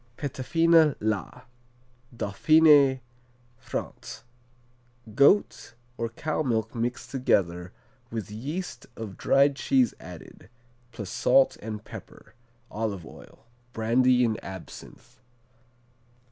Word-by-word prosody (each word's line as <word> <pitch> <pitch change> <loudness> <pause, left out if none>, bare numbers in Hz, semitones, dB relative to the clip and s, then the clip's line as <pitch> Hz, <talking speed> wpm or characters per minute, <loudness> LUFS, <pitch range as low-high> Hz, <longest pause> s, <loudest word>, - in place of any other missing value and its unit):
Petafina, 160 +3 +2
La 110 +3 -3 0.7
Dauphiné, 140 +5 +4 0.6
France 120 -2 -7 0.9
Goat 140 - +3 0.2
or 115 -1 -3
cow 155 +7 -3
milk 115 -6 -1
mixed 120 +1 -4
together, 90 -9 0 0.4
with 110 -3 -6
yeast 140 - -6
of 110 -4 -7
dried 140 +1 +3
cheese 255 - +2
added, 90 -3 -12 0.4
plus 105 -5 -7
salt 130 +2 +3
and 105 -1 -7
pepper, - - -12 0.4
olive 105 -6 -4
oil, - - -15 0.3
brandy 125 +3 +3
and 110 -1 -2
absinthe. 95 +6 -11
120 Hz, 90 wpm, -26 LUFS, 110-140 Hz, 0.9 s, Dauphiné